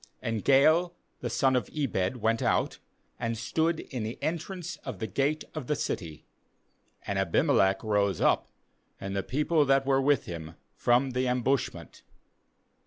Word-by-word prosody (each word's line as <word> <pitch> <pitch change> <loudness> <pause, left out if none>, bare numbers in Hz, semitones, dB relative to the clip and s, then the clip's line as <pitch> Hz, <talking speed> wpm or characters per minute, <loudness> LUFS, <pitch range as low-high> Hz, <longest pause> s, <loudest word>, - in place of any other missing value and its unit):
35And 115 -2 -1
Gaal 155 - +4 0.3
the 120 - -3
son 130 +3 +2
of 125 - 0
Ebed 130 -6 -1
went 115 0 +1
out, - - +1 0.4
and 115 -1 -2
stood 160 +8 0
in 125 -4 -6
the 110 +3 -4
entrance 175 +2 -4
of - - -7
the 110 - -3
gate 140 +6 0
of 155 -6 -6
the 150 - +1
city; 85 - -4 0.8
and 100 -1 -1
Abimelech 95 - +2
rose 105 -2 +1
up, - - +2 0.5
and 95 0 -5
the 100 - +1
people 150 - +1
that 135 0 +3
were 135 0 +3
with 140 -2 +2
him, 80 -2 -7 0.2
from 125 +2 +2
the 125 0 0
ambushment. 125 - -1
125 Hz, 155 wpm, -28 LUFS, 110-145 Hz, 0.8 s, Gaal